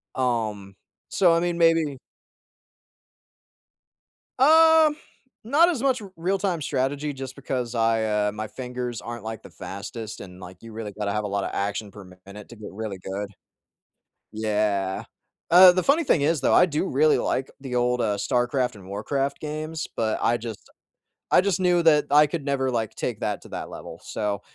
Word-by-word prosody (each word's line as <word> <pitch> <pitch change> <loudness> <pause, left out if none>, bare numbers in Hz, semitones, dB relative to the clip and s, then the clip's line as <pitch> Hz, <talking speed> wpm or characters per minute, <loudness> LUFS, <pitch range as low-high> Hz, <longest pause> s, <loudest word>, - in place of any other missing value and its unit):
Um, 110 -6 -2 0.3
so 175 -3 +4
I 165 - +3
mean, 175 0 -1
maybe 165 -4 +3 2.4
Um, 320 +1 +6 0.5
not 295 +10 +4
as 310 -9 -2
much 260 -3 +1
Real-Time 180 0 -1
Strategy 145 +2 -1
just 135 -1 -7
because 125 -3 -4
I, 115 -1 +2 0.2
uh, - - 0
my 110 +1 -5
fingers 125 -1 -5
aren't, 120 -2 -7
like, 110 0 -6
the - - -12
fastest 105 +3 -7
and, 90 -1 -11
like, 90 0 -11
you 115 - -10
really 110 -1 -6
gotta 105 0 -3
have 105 +1 -1
a - - -2
lot 100 0 -2
of - - -3
action-per-minute 100 -1 -6
to 120 - -11
get 110 -2 -10
really 105 -1 -5
good. 95 +2 -5 1.0
Yeah. 105 -3 -1 0.5
Uh, 180 +1 +10
the 185 0 0
funny 300 +5 +3
thing 165 - +3
is 155 +2 +2
though, - - +2
I - - +7
do 160 +2 -2
really 150 +1 +3
like 135 - -1
the 135 -2 -5
old, 125 0 +1
uh, 105 -3 +1
StarCraft 125 +4 0
and 95 -2 -13
Warcraft 135 +8 -2
games, 155 +1 -4
but 110 -1 0
I 120 - +2
just 115 -2 -8 0.6
I - - +6
just 190 -2 0
knew 180 -2 +3
that 150 -3 +5
I 150 +1 +6
could 145 -1 -5
never, 135 -2 0
like, 115 -3 -2
take - - -4
that - - -2
to - - -14
that - - -6
level, - - -9
so 105 -2 -3
125 Hz, 170 wpm, -24 LUFS, 105-160 Hz, 2.4 s, Uh